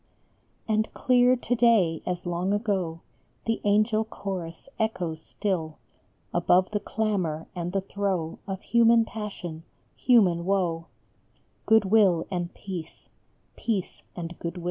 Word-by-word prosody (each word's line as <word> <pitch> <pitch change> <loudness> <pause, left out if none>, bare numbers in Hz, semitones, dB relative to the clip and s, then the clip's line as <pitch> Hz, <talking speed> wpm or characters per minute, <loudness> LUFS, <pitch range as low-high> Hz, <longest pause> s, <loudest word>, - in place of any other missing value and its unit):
And 215 0 +1
clear 250 -1 +4
to 245 0 -1
day 220 -9 +3
as 180 0 -3
long 175 +3 -1
ago 190 -6 -1 0.4
The 225 0 -1
angel 215 +2 +3
chorus 185 -5 -6
echoes 180 -8 -2
still, 165 -7 -3 0.6
Above 185 +1 +3
the 210 - 0
clamor 190 -9 -1
and 175 0 -3
the 195 +1 0
throe 190 -4 -2
Of 190 -1 -4
human 235 -1 +5
passion, 195 -7 -6 0.3
human 190 -9 +4
woe, 175 -3 0 0.8
Good 220 -2 +5
will 190 -5 +4
and 175 -2 -2
Peace: 180 -5 -8 0.5
Peace 210 -6 -3
and 170 0 -6
Good 170 +1 -4
will. - - -5
195 Hz, 125 wpm, -26 LUFS, 170-220 Hz, 0.8 s, human